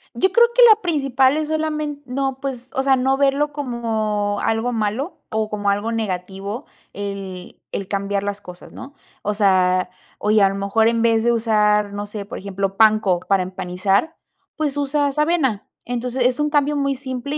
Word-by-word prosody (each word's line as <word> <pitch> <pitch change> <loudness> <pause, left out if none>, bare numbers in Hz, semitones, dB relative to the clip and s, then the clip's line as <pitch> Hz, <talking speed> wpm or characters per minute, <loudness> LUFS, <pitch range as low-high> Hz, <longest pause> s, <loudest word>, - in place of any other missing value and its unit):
Yo 380 - +2
creo 475 0 +6
que - - +4
la 435 0 +6
principal 275 -5 +2
es 310 -1 -1
solamen 305 -2 -2
no, 270 +1 -2
pues, 260 -2 -5
o 265 - 0
sea, 270 -1 +4
no 265 +1 +2
verlo 280 +2 +1
como 220 -6 -2
algo 225 +2 0
malo 225 - -2
o 220 -1 -1
como 205 -1 -1
algo 205 +3 0
negativo 200 +2 -4 0.3
el 195 -2 -7
el 195 - -4
cambiar 200 0 -1
las 205 0 -4
cosas, 180 -2 -12
¿no? 280 +2 -10 0.3
O 210 - -1
sea, 185 -3 +2 0.3
oye, 210 0 +3
a 195 - +5
lo 195 - -4
mejor 200 +3 +2
en 230 0 0
vez 225 -1 +3
de 240 - +3
usar, 210 -3 +2
no 205 0 -4
sé, 205 -1 -7
por - - -7
ejemplo, 195 0 -3
panko 215 -4 +4
para 195 -1 +1
empanizar, 190 - -1 0.4
pues 295 -3 -1
usas 285 0 0
avena. 300 - +1 0.2
Entonces 245 +1 -2
es 250 +3 +1
un 300 - +1
cambio 290 0 +1
muy 275 -1 0
simple 265 +2 -5
225 Hz, 180 wpm, -21 LUFS, 200-275 Hz, 0.4 s, creo